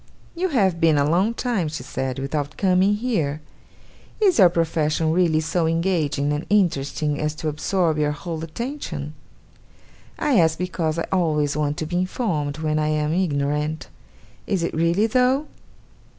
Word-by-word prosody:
'You 365 Hz, +2 st, -1 dB
have 195 Hz, -, +2 dB
been 160 Hz, -2 st, +4 dB
a 140 Hz, 0 st, +2 dB
long 190 Hz, +9 st, +2 dB
time,' 230 Hz, -11 st, -1 dB
she 150 Hz, -4 st, -5 dB
said, 130 Hz, 0 st, -4 dB
'without 145 Hz, +2 st, -3 dB
coming 190 Hz, +1 st, +3 dB
here. 175 Hz, -, -1 dB, 0.8 s
Is 385 Hz, -, +3 dB
your 185 Hz, -3 st, +8 dB
profession 160 Hz, -2 st, 0 dB
really 165 Hz, -2 st, +2 dB
so 165 Hz, +1 st, 0 dB
engaging 160 Hz, -4 st, 0 dB
and 150 Hz, +2 st, -4 dB
interesting 150 Hz, -6 st, +1 dB
as 150 Hz, 0 st, -1 dB
to 155 Hz, -, -4 dB
absorb 160 Hz, +1 st, 0 dB
your 150 Hz, -1 st, +2 dB
whole 160 Hz, +2 st, -5 dB
attention? 235 Hz, -, -5 dB, 1.0 s
I 270 Hz, -9 st, +2 dB
ask 160 Hz, -1 st, +3 dB
because 170 Hz, -3 st, -2 dB
I 165 Hz, -, -1 dB
always 155 Hz, -6 st, +1 dB
want 150 Hz, -1 st, -1 dB
to 155 Hz, -, -3 dB
be 175 Hz, +3 st, -2 dB
informed, 175 Hz, -, -1 dB
when 155 Hz, -1 st, -1 dB
I 150 Hz, -, 0 dB
am 155 Hz, 0 st, 0 dB
ignorant. 150 Hz, -3 st, -1 dB, 0.6 s
Is 190 Hz, -5 st, 0 dB
it -, -, -2 dB
really, 170 Hz, +6 st, +2 dB
though? 255 Hz, +5 st, +2 dB
160 Hz, 155 wpm, -23 LUFS, 150-185 Hz, 1.0 s, your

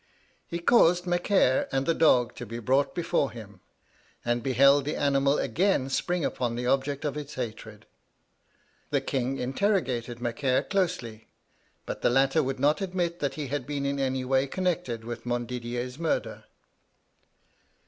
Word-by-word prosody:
He 170 Hz, -, -3 dB
caused 175 Hz, -2 st, +4 dB
Macaire 175 Hz, -6 st, +2 dB
and 135 Hz, 0 st, 0 dB
the 165 Hz, -, +2 dB
dog 125 Hz, -8 st, +3 dB
to 120 Hz, -, -6 dB
be 115 Hz, +2 st, -6 dB
brought 130 Hz, +5 st, +1 dB
before 165 Hz, -5 st, 0 dB
him, 105 Hz, -5 st, -11 dB, 0.7 s
and 120 Hz, 0 st, 0 dB
beheld 140 Hz, +3 st, +4 dB
the 150 Hz, +3 st, -3 dB
animal 140 Hz, 0 st, +2 dB
again 140 Hz, -, +1 dB
spring 175 Hz, +4 st, 0 dB
upon 120 Hz, -2 st, -2 dB
the 125 Hz, +1 st, -3 dB
object 135 Hz, +3 st, 0 dB
of 145 Hz, -, -2 dB
its 150 Hz, -1 st, -6 dB
hatred. 110 Hz, -3 st, -6 dB, 1.0 s
The -, -, +2 dB
king 135 Hz, 0 st, -2 dB
interrogated 130 Hz, -, -1 dB
Macaire 125 Hz, +2 st, 0 dB
closely, 170 Hz, -, -2 dB, 0.6 s
but -, -, -5 dB
the -, -, +3 dB
latter 135 Hz, +4 st, +3 dB
would 135 Hz, -2 st, -3 dB
not 150 Hz, +7 st, +2 dB
admit 180 Hz, -3 st, -2 dB
that 140 Hz, -2 st, -2 dB
he 145 Hz, -3 st, -5 dB
had 140 Hz, -2 st, -3 dB
been 145 Hz, -1 st, -2 dB
in 140 Hz, 0 st, -1 dB
any 130 Hz, -1 st, -1 dB
way 135 Hz, +1 st, +2 dB
connected 175 Hz, -9 st, -2 dB
with 120 Hz, +1 st, -7 dB
Montdidier's 120 Hz, +2 st, -3 dB
murder. 165 Hz, -1 st, -2 dB
135 Hz, 150 wpm, -27 LUFS, 120-155 Hz, 1.0 s, caused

